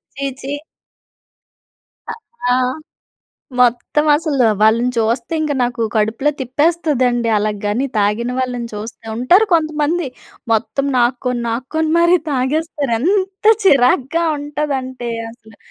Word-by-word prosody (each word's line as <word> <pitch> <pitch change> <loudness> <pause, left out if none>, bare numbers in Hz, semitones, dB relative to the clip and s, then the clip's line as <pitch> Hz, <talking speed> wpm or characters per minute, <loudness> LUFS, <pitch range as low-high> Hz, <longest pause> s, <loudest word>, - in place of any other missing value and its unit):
ఛీ 275 0 -4
ఛీ. 275 +1 -5 2.0
ఆ! - - +3 1.1
మొత్తం 250 +5 +2
అసలు 290 -5 +1 0.2
వాళ్ళని 230 +3 +3
చూస్తే 230 +4 0
ఇంక 305 -1 -1
నాకు 240 -1 -1
కడుపులో 220 +6 +1
తిప్పేస్తుదండి. 260 -3 +1
అలాగాని 210 +4 -1
తాగిన 210 +4 0
వాళ్ళని 245 -2 -2
చూస్తే 220 +2 -8
ఉంటారు 345 - +4
కొంతమంది, 310 0 0 0.5
మొత్తం 240 +5 0
నాక్కొని, 245 0 0
నాక్కొని 265 +7 -2
మరి 340 +1 +5
తాగేస్తారు. 285 +1 -1
ఎంత 380 - -1 0.2
చిరాకుగా 275 +1 +3
ఉంటదంటే 275 -4 -4 0.2
అసలు 220 -2 -18
255 Hz, 100 wpm, -17 LUFS, 235-300 Hz, 2.0 s, మరి